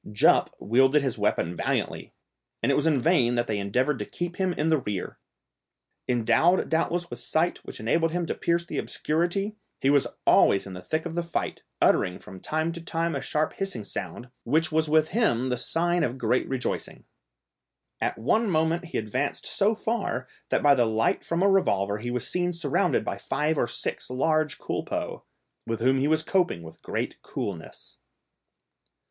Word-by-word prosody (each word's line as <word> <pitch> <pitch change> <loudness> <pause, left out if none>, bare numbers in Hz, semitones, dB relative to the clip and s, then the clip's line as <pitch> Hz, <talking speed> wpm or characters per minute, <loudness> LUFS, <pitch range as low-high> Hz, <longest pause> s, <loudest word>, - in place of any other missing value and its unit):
Jup 105 - +4
wielded 135 +6 +3
his 130 -4 -2
weapon 85 +2 0
valiantly, - - -2 0.5
and 125 - +3
it - - +3
was 150 - +2
in 150 -4 +3
vain 125 -5 +3
that 120 0 +1
they 105 -3 -2
endeavoured 125 +9 0
to - - -3
keep 175 0 -5
him 190 -1 +1
in 160 -1 0
the 160 -2 +3
rear. 105 -6 -5 0.9
Endowed 120 +9 +3
doubtless 170 +1 0
with 120 - -6
sight 160 +8 +1
which - - -10
enabled 160 +9 +1
him 175 0 -1
to - - -2
pierce 170 0 0
the - - -3
obscurity, 175 +7 -1 0.2
he 135 - +3
was 145 -2 +4 0.2
always 100 - +5
in 95 - -8
the 90 - -7
thick 155 - -2
of 170 - -4
the 175 - 0
fight, 170 -1 -3 0.2
uttering 90 0 +3
from 95 0 -12
time 160 - -1
to 170 0 -7
time 165 0 -1
a 140 - -2
sharp 150 +3 -1
hissing 195 - -4
sound, 120 +4 -6
which 155 +6 +1
was 155 0 +1
with 155 0 +4
him 130 - +1
the 125 - +1
sign 175 +7 0
of 125 +2 -1
great 125 0 0
rejoicing. 130 -1 -3 1.0
At - - -1
one 210 - +1
moment 165 +1 +1
he 175 - -4
advanced 125 +6 -2
so 210 +3 +1
far, 230 +2 -2 0.2
that - - +1
by 145 -1 +7
the 120 -4 +3
light 110 +1 +1
from 170 +2 0
a - - +5
revolver 100 - +2
he 120 +2 -4
was 125 -1 -2
seen 180 0 0
surrounded 165 -4 +1
by - - -3
five 155 +2 0
or 120 - +1
six - - -4
large 155 +4 +1
culpeux, - - -4 0.5
with 115 -1 -2
whom 130 +3 +3
he 140 - +2
was 155 +1 +2
coping 175 - +1
with 80 0 -12
great - - -4
coolness. 90 -6 -6
150 Hz, 185 wpm, -26 LUFS, 120-170 Hz, 1.0 s, by